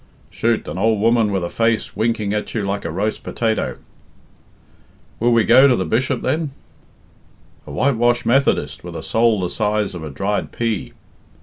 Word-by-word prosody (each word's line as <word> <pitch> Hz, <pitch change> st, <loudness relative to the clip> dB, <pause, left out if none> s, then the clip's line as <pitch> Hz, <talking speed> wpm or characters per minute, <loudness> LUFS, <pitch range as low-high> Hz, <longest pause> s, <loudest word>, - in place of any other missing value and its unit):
"Chut! 115 Hz, 0 st, 0 dB
an 80 Hz, +5 st, -5 dB
ould 110 Hz, +1 st, +2 dB
woman 115 Hz, -1 st, +3 dB
with 95 Hz, -2 st, -1 dB
a 85 Hz, -, -3 dB
face 115 Hz, -1 st, 0 dB
winking 110 Hz, -2 st, 0 dB
at 105 Hz, +2 st, -3 dB
you 110 Hz, -, -1 dB
like 100 Hz, +1 st, -3 dB
a -, -, -2 dB
roast 100 Hz, +6 st, -2 dB
potato." 110 Hz, -2 st, -2 dB, 1.4 s
"Will 120 Hz, +2 st, +2 dB
we 115 Hz, -1 st, +4 dB
go 130 Hz, +8 st, +7 dB
to 130 Hz, -, +4 dB
the 95 Hz, -, -1 dB
Bishop, 125 Hz, -, 0 dB
then?" 155 Hz, -1 st, 0 dB, 1.2 s
"A -, -, -8 dB
whitewashed 120 Hz, -, +1 dB
Methodist 135 Hz, +3 st, +1 dB
with -, -, -8 dB
a -, -, -6 dB
soul 115 Hz, -3 st, +2 dB
the 90 Hz, -, -1 dB
size 105 Hz, -2 st, -1 dB
of 90 Hz, -, -7 dB
a 80 Hz, -, -5 dB
dried 100 Hz, +9 st, -2 dB
pea." 115 Hz, -4 st, -2 dB
110 Hz, 175 wpm, -20 LUFS, 100-115 Hz, 1.4 s, go